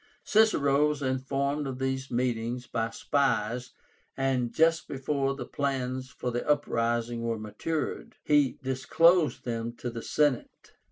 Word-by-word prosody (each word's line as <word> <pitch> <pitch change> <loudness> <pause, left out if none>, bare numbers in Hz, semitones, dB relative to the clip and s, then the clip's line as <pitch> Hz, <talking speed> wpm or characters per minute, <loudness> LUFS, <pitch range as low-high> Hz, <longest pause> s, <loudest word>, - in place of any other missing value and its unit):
Cicero 150 -10 +4
was 150 -1 -2
informed 135 +2 -1
of 130 -1 -4
these 130 0 -2
meetings 120 0 -1
by 115 -1 -2
spies, 120 -1 0 0.5
and 130 -3 0
just 165 +1 +3
before 135 0 -1
the - - -6
plans 130 -2 -2
for 125 -1 -4
the 120 +1 -2
uprising 120 -4 0
were 115 -1 -1
matured, 110 +9 -4
he 145 -4 +3
disclosed 160 +6 +3
them 115 -1 -3
to 120 0 -5
the 115 0 -6
Senate. 145 -2 0
130 Hz, 130 wpm, -28 LUFS, 120-145 Hz, 0.5 s, Cicero